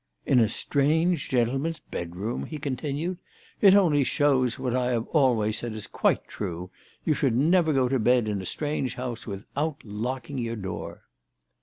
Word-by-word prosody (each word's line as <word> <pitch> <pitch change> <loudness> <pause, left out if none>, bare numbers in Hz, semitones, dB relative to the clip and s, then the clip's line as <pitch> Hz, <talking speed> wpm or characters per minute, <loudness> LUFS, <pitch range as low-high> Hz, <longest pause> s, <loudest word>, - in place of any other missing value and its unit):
" - - -44
In 130 - +4
a 110 -3 +4
strange 160 +5 +1
gentleman's 135 +6 0
bedroom! 90 +2 -4
" - - -10
he 155 - -5
continued. 150 +5 -3 0.2
" - - -29
It 195 -1 +8
only 160 -8 +4
shows 135 -4 +2
that 130 - -11
what 125 -1 0
I 125 -1 +1
have 120 -2 0
always 115 -7 +2
said 120 -2 -4
is 110 -1 -6
quite - - 0
true. 90 -2 -5 0.3
You 155 - +3
should 135 -5 +1
never 160 +5 +4
go 135 -3 +3
to 135 +1 +1
bed 120 0 +3
in 105 -2 -1
a 95 - -6
strange 145 -4 -2
house 125 -2 -5
without 135 +9 -4
locking 125 +6 -4
your 115 -1 -2
door." 95 -4 -6
130 Hz, 185 wpm, -26 LUFS, 115-145 Hz, 0.3 s, It